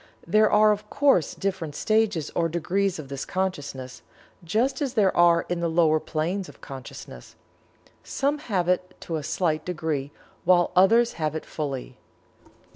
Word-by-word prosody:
There 215 +5 +4
are, 210 0 +5
of 210 0 -3
course, 275 - +2
different 175 -6 -3
stages 215 -7 +1
or 165 -1 +1
degrees 175 +4 -1
of 155 -3 -8
this 135 0 -5
Consciousness, 145 -9 -4 0.4
just 235 - 0
as 275 -2 -2
there 200 -4 +3
are 170 -1 +4
in 175 -1 -2
the 170 -1 0
lower 160 -1 +3
planes 175 +6 -3
of - - -15
consciousness. 130 - -10 0.7
Some 285 +2 -1
have 195 - -1
it 180 0 0
to 165 - -3
a - - -4
slight 155 0 -1
degree, 155 -5 -3 0.3
while 175 0 +4
others 230 +6 +5
have 155 0 -1
it 160 - -5
fully. 140 -4 -5
175 Hz, 155 wpm, -25 LUFS, 155-200 Hz, 0.7 s, are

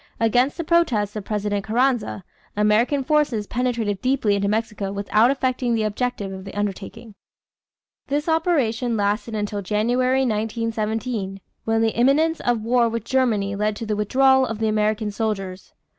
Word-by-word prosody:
Against 245 +4 +2
the 335 - -2
protests 255 - +1
of 210 -2 -5
President 205 -1 -2
Carranza, 230 -2 0 0.3
American 220 +7 +2
forces 270 -7 +1
penetrated 235 -4 -2
deeply 255 -5 +1
into 200 0 0
Mexico 210 -2 -2
without 210 +3 +2
effecting 255 -3 0
the 220 - 0
object 245 +3 -2
of 190 -1 -6
the 195 - -9
undertaking. 205 +3 -5 0.9
This 290 +3 -1
operation 265 -9 +1
lasted 210 +2 -1
until 205 -1 -2
January, 245 +6 +1
1917, 220 -2 -2 0.3
when 225 0 +1
the 225 - 0
imminence 300 +7 +3
of 240 -3 0
war 235 0 +2
with 230 -1 -4
Germany 220 -7 +1
led 210 +1 0
to 225 - -6
the 215 -1 -1
withdrawal 265 +5 +3
of 225 -4 -3
the 220 0 0
American 215 0 0
soldiers. 195 -3 -4
225 Hz, 150 wpm, -22 LUFS, 210-255 Hz, 0.9 s, imminence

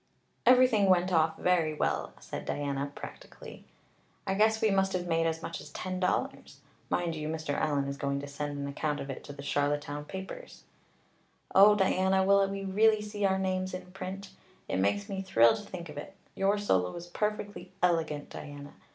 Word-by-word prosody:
"Everything 250 -5 +6
went 180 0 +3
off 160 -1 +3
very 165 -4 +2
well," - - -1
said - - -7
Diana 140 -1 -2
practically. - - -10 0.6
"I 190 - 0
guess 220 +2 +3
we 220 -1 +3
must 195 0 +2
have 180 -1 -1
made 165 -1 +1
as 160 0 -2
much - - -5
as - - -11
ten 185 0 -4
dollars. 180 - -2 0.3
Mind 175 -2 0
you, 155 -1 -4
Mr. 155 -2 -3
Allan 145 -2 0
is 140 0 -4
going 140 0 -1
to - - -6
send 145 0 -4
an 140 0 -3
account 145 +1 -2
of 135 - -5
it 135 - -8
to - - -8
the 140 0 -9
Charlottetown 145 +1 -1
papers." 190 - -8 0.9
"Oh, 205 +2 +8
Diana, 190 -1 +3
will 200 0 +4
we 195 0 -4
really 215 +2 +3
see 210 -1 -2
our 190 -1 +3
names 185 -1 -1
in 185 0 -9
print? 190 +1 -7 0.4
It - - -1
makes 100 - +1
me 195 -2 -3
thrill 115 -12 +5
to - - -6
think 185 -4 -8
of 150 -1 -7
it. 195 - -9 0.2
Your 195 +2 +2
solo 95 - +1
was 170 - -7
perfectly 205 0 -3
elegant, 160 -4 +1
Diana. 145 -1 -9
180 Hz, 185 wpm, -30 LUFS, 145-195 Hz, 0.9 s, Oh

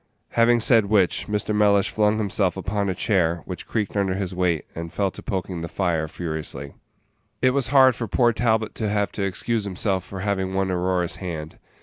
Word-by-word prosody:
Having 120 0 +3
said 115 -2 +5
which, 100 -4 +2
Mr. 105 0 -1
Mellish 105 -1 +3
flung 105 0 +2
himself 100 -3 0
upon 100 +1 -1
a 95 - -1
chair, 85 -4 +1
which 90 -2 -7
creaked 105 -3 -2
under 95 -2 +1
his 95 -2 -3
weight, 90 -4 0
and 85 0 -6
fell 100 -2 0
to - - -10
poking 95 -3 -3
the 85 - -4
fire 85 -3 -1
furiously. 75 -4 -5 0.7
It 130 - +3
was 135 -2 0
hard 130 -1 +6
for 115 0 -4
poor 120 +3 +3
Talbot 110 -2 +1
to 110 - -2
have 105 0 0
to - - -5
excuse 105 +4 -1
himself 95 -1 -1
for 95 0 -8
having 95 -2 -1
won 95 -1 0
Aurora's 90 -1 0
hand. 80 -4 -6
100 Hz, 195 wpm, -23 LUFS, 90-105 Hz, 0.7 s, hard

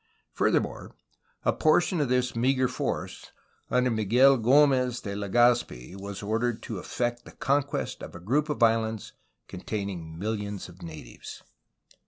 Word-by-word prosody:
Furthermore, - - 0 0.5
a - - +3
portion 160 +2 +3
of 140 - 0
this 125 -1 +1
meagre 130 +2 +2
force, - - -4 0.4
under 125 0 +2
Miguel 120 +5 +4
G6mez 125 0 +3
de 100 - -4
Legazpi, 105 - +1
was 100 +1 -7
ordered 115 +2 -1
to 110 -6 -5
effect 120 +4 -2
the - - -13
conquest 140 +1 -1
of - - -9
a - - -8
group 140 - 0
of 145 -5 0
islands 110 -1 +1 0.3
containing 90 -4 -5
mil 110 +5 -1
lions 105 -1 -5
of 90 +1 -15
natives. 80 -7 -10
115 Hz, 140 wpm, -27 LUFS, 100-125 Hz, 0.5 s, Miguel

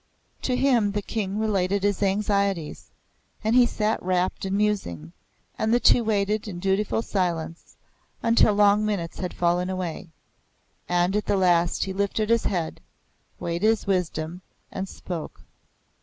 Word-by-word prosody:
To 255 - 0
him 245 -6 +2
the 205 0 -2
King 200 -1 -3
related 200 -2 0
his 205 -1 0
anxieties; 200 -4 0 0.5
and 220 +2 +2
he 250 -1 +6
sat 215 -1 -1
rapt 185 +1 -1
in 190 +1 -1
musing, 190 - -1 0.5
and 220 - +1
the 240 - +4
two 245 - +5
waited 215 0 0
in 190 -4 -6
dutiful 195 +4 0
silence 170 -5 -3 0.5
until 230 -2 +4
long 205 0 +4
minutes 200 -6 -3
had 180 -2 -3
fallen 175 +1 0
away; 185 -1 -4 0.8
and 175 +2 +2
at 210 - -1
the 200 - +2
last 175 -2 +2
he 190 - -4
lifted 200 +3 -1
his 230 -1 +2
head, 170 -5 -2 0.6
weighted 170 +5 0
with 225 -1 0
wisdom, 180 -2 -2 0.3
and 190 0 -4
spoke. 170 -4 -7
195 Hz, 145 wpm, -25 LUFS, 180-210 Hz, 0.8 s, he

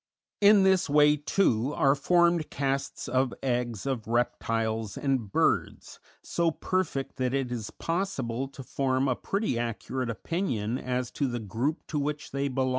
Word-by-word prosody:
In 205 -1 +7
this 190 -3 +3
way, 150 0 +5
too, 145 - +1
are 135 0 +4
formed 170 +3 +3
casts 140 0 -2
of 130 -1 +1
eggs 120 -4 -1
of 130 -6 -2
reptiles 115 -2 -1
and 130 -8 -1
birds, - - 0 0.2
so 170 -1 +1
perfect 160 -4 -2
that 130 0 0
it 135 -3 -1
is 115 -3 -4
possible 135 -9 -2
to 135 0 -10
form 130 0 0
a 130 - +1
pretty 195 - -1
accurate 120 +2 -3
opinion 120 - -2
as 125 -1 -2
to 140 - -1
the 120 -1 -3
group 115 - -2
to 150 - -2
which 150 +1 -3
they 140 +1 -1
belong. 130 -1 0
135 Hz, 155 wpm, -28 LUFS, 120-150 Hz, 0.2 s, In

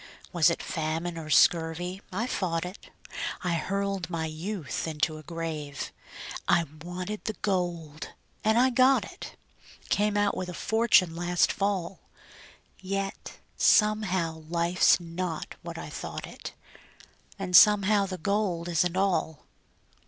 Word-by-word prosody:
Was 165 -5 +5
it - - -2
famine 165 +1 -2
or 160 -2 -7
scurvy 170 +4 +3
I 210 +6 -1
fought 180 -8 -1
it; 180 +3 -10 0.5
I 180 -2 0
hurled 195 +2 -2
my 165 -2 -2
youth 165 +1 -4
into 155 0 -1
a - - -10
grave. 155 -3 -5 0.6
I 170 - +4 0.2
wanted 185 +4 -5
the 220 - -2
gold, 170 -6 -2 0.3
and 220 +1 +3
I 255 +2 +4
got 255 +2 +4
it - - -10 0.5
Came 210 0 +2
out 205 0 +2
with 185 - -4
a 180 - -6
fortune 220 -7 +3
last 175 +1 +2
fall, 195 -3 -2 0.8
Yet 195 +1 -4 0.2
somehow 190 -7 +3
life's 170 +2 +3
not 170 -1 -4
what - - -7
I - - -7
thought - - -6
it, - - -9 0.8
And 185 -2 -1
somehow 205 0 +6
the 185 -1 -5
gold 185 -2 -1
isn't 175 +2 +1
all. 180 -6 0
180 Hz, 130 wpm, -28 LUFS, 165-200 Hz, 0.8 s, somehow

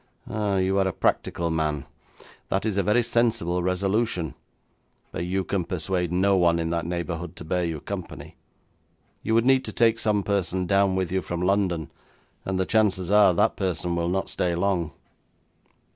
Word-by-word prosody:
'Ah, 105 -2 -1
you 95 +1 +1
are 95 - +2
a - - 0
practical 85 -1 0
man. 75 -3 -1 0.6
That 95 +2 0
is 110 -3 0
a 100 - +2
very 105 +6 +2
sensible 115 -7 +1
resolution. 90 - 0 0.8
But 85 - -3
you 95 +2 -1
can 95 -1 -1
persuade 90 0 -2
no 95 +2 +3
one 85 -2 +3
in 80 0 -1
that 85 0 -2
neighbourhood 85 -1 -4
to - - -8
bear 90 +2 0
you 80 -3 -2
company. 95 +2 -7 0.9
You 110 - 0
would 115 +1 +3
need 130 0 +4
to 110 - -4
take 115 0 +3
some 105 -2 +1
person 95 -2 -1
down 100 0 +2
with 95 -2 -1
you 95 0 0
from 85 0 -4
London, 90 -5 0 0.5
and 95 -1 -1
the 95 - +1
chances 100 -4 +1
are, 105 -4 +6
that - - +2
person 90 -2 -1
will 85 0 0
not 95 +1 -1
stay 90 -1 -1
long.' 90 -3 0
95 Hz, 175 wpm, -25 LUFS, 85-100 Hz, 0.9 s, are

